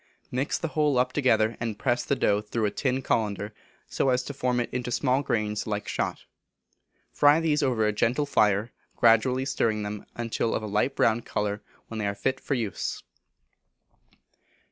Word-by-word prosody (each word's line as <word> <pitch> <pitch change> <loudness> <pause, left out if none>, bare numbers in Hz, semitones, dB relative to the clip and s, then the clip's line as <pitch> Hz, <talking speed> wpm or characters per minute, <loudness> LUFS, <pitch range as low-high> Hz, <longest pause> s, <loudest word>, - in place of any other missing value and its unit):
Mix 130 +3 -1
the 165 - -3
whole 150 -3 +1
up 125 0 +1
together, 115 -5 +2
and 115 -3 -3
press 120 +1 0
the 140 - 0
dough 105 -5 +2
through 110 +1 -2
a 105 - 0
tin 130 +1 -1
cullender 105 -3 -1 0.4
so 135 - 0
as 125 0 +2
to 145 - -6
form 125 -2 0
it 120 - 0
into 125 -1 -2
small 130 +2 +1
grains 105 -5 -1
like 105 -1 -3
shot. - - -3 0.9
Fry 145 +2 +5
these 160 -2 +1
over 125 -6 +1
a 105 - +1
gentle 125 +7 +1
fire, 105 -4 +2 0.2
gradually 125 +3 +4
stirring 110 -5 0
them 105 0 -6
until 115 -1 -1
of 110 - -2
a - - -3
light 105 +6 0
brown 115 +1 +2
colour, 105 -1 -2 0.3
when 115 - -6
they 105 - -1
are 100 - -2
fit 130 +5 -1
for 140 - -2
use. 110 -6 -3 1.1
2165. - - -38
120 Hz, 185 wpm, -27 LUFS, 105-130 Hz, 1.1 s, Fry